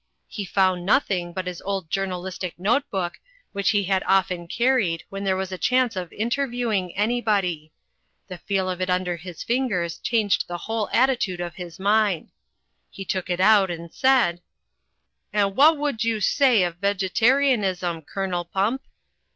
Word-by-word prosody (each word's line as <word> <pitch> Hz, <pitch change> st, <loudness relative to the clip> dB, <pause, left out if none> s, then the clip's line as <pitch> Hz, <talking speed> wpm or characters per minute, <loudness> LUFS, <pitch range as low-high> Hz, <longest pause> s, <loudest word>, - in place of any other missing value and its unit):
He 205 Hz, -, -5 dB
found 185 Hz, -1 st, +1 dB
nothing 180 Hz, -4 st, +1 dB
but 185 Hz, +1 st, -4 dB
his 180 Hz, -1 st, -5 dB
old 195 Hz, -5 st, -4 dB
journalistic 185 Hz, -2 st, -3 dB
note 225 Hz, +10 st, +1 dB
book, 180 Hz, -3 st, -3 dB, 0.3 s
which 200 Hz, -1 st, +1 dB
he 205 Hz, -3 st, +1 dB
often 185 Hz, -2 st, +1 dB
car 255 Hz, +8 st, +2 dB
ried 165 Hz, -8 st, -1 dB
when 195 Hz, 0 st, -6 dB
there 190 Hz, -1 st, +1 dB
was 190 Hz, 0 st, -3 dB
a 185 Hz, -, -5 dB
chance 250 Hz, +4 st, +2 dB
of 180 Hz, -3 st, -5 dB
interviewing 235 Hz, -5 st, -1 dB
anybody. 205 Hz, -8 st, 0 dB, 0.6 s
The 180 Hz, -, -8 dB
feel 190 Hz, +1 st, -1 dB
of 185 Hz, 0 st, -3 dB
it 185 Hz, -, -1 dB
imder 180 Hz, -1 st, 0 dB
his 175 Hz, 0 st, -8 dB
fingers 230 Hz, -10 st, -1 dB
changed 220 Hz, -4 st, +1 dB
the 175 Hz, -, -4 dB
whole 220 Hz, +3 st, -3 dB
at 260 Hz, +3 st, +4 dB
titude 190 Hz, -8 st, -2 dB
of 175 Hz, -1 st, -4 dB
his 175 Hz, -2 st, -9 dB
mind. 205 Hz, -3 st, +1 dB, 0.6 s
He 195 Hz, -, -8 dB
took 185 Hz, -1 st, -3 dB
it 175 Hz, 0 st, -1 dB
out 200 Hz, 0 st, +5 dB
and 170 Hz, -1 st, -7 dB
said: 245 Hz, -10 st, +3 dB, 0.9 s
"And 200 Hz, -2 st, +1 dB
wha' 300 Hz, +6 st, +7 dB
would 285 Hz, -7 st, -2 dB
you 225 Hz, -1 st, 0 dB
say 240 Hz, 0 st, +3 dB
of 175 Hz, -1 st, -2 dB
Vegetarianism, 200 Hz, -2 st, +1 dB
Colonel 180 Hz, +2 st, -3 dB
Pump?" 200 Hz, +9 st, -1 dB
195 Hz, 160 wpm, -24 LUFS, 180-225 Hz, 0.9 s, wha